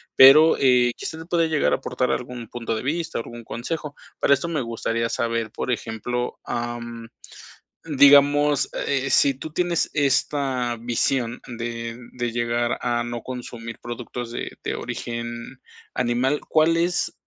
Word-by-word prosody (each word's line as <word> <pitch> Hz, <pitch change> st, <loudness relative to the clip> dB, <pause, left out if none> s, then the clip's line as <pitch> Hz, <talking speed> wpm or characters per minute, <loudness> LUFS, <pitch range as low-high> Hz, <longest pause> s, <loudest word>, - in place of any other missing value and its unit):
pero, 150 Hz, +5 st, +9 dB
eh, 125 Hz, -2 st, +4 dB
quizás 160 Hz, 0 st, -6 dB
puede 165 Hz, -2 st, +2 dB
llegar 155 Hz, -2 st, +2 dB
a -, -, +3 dB
aportar 125 Hz, -1 st, -1 dB
algún 125 Hz, -2 st, -4 dB
punto 115 Hz, -1 st, -4 dB
de 110 Hz, -, -4 dB
vista 165 Hz, +4 st, -2 dB
o -, -, -1 dB
algún 120 Hz, 0 st, -10 dB
consejo. 145 Hz, +6 st, -5 dB, 0.2 s
Para 140 Hz, -, +4 dB
eso 140 Hz, +5 st, 0 dB
me 155 Hz, -5 st, -1 dB
gustaría 115 Hz, 0 st, -2 dB
saber, 115 Hz, -2 st, -1 dB
por 125 Hz, -, -3 dB
ejemplo, 120 Hz, +2 st, -3 dB
am, 120 Hz, -1 st, -4 dB, 0.8 s
digamos, 145 Hz, -1 st, +5 dB, 0.2 s
eh, 135 Hz, -1 st, 0 dB
sí 140 Hz, 0 st, +4 dB
tú 150 Hz, +4 st, -8 dB
tienes 175 Hz, 0 st, 0 dB
esta 135 Hz, -4 st, +1 dB
visión 120 Hz, 0 st, 0 dB
de 115 Hz, -1 st, -5 dB, 0.2 s
de 120 Hz, -2 st, -2 dB
llegar 120 Hz, 0 st, 0 dB
a 120 Hz, -1 st, 0 dB
no 120 Hz, 0 st, -5 dB
consumir 120 Hz, -2 st, -7 dB
productos 120 Hz, 0 st, -6 dB
de 120 Hz, -, -5 dB
de -, -, -2 dB
origen 120 Hz, +2 st, -5 dB, 0.3 s
animal. 125 Hz, +4 st, +1 dB
¿Cuál 160 Hz, +1 st, +3 dB
es 175 Hz, +1 st, 0 dB
125 Hz, 145 wpm, -23 LUFS, 120-140 Hz, 0.8 s, pero